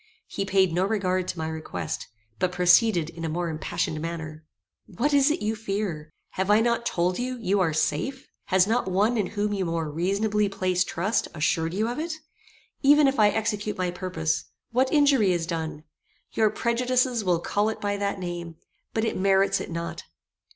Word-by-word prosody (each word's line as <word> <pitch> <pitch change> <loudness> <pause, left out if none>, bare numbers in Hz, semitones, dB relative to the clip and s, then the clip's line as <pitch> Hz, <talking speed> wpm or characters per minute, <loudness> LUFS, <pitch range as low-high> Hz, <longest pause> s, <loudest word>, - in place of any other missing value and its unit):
He 195 - -4
paid 190 -3 +2
no 180 +2 +2
regard 185 -3 0
to 180 - -4
my 160 0 -2
request, 155 - -5 0.3
but 185 - +1
proceeded 180 -1 +4
in 165 0 -9
a 165 - -1
more 170 +2 -2
impassioned 155 0 -2
manner. 160 -2 -6 0.4
"What 240 +9 -1
is 280 +1 +5
it 310 +4 -1
you 215 +1 0
fear? 195 -8 -3 0.2
Have 190 +1 -2
I 210 +1 +6
not 235 +1 +1
told 180 +3 0
you, 255 +1 -2
you 205 -3 0
are 175 -4 +2
safe? 265 - -1 0.2
Has 190 -1 +4
not 225 -1 0
one 205 +6 +2
in 210 -5 0
whom 205 0 -2
you 195 -2 -1
more 165 -3 -2
reasonably 200 +5 0
place 185 -2 +1
trust 190 +5 -1
assured 165 +2 0
you 215 +3 +1
of 245 +4 -3
it? 320 0 -3 0.7
Even 290 +1 +6
if 270 -2 0
I 210 -1 +6
execute 210 -1 -2
my 180 -1 -1
purpose, 175 -3 -2 0.3
what 255 +3 +2
injury 280 - +4
is 170 -2 -1
done? 160 -3 -4 0.5
Your 220 -1 +3
prejudices 245 +1 +1
will 180 -3 +2
call 205 +5 0
it 220 - -5
by 205 0 -1
that 200 0 -1
name, 175 -2 -5 0.4
but 220 0 +1
it - - -1
merits 195 +1 +2
it - - -6
not. 170 0 -5
195 Hz, 185 wpm, -26 LUFS, 170-220 Hz, 0.7 s, I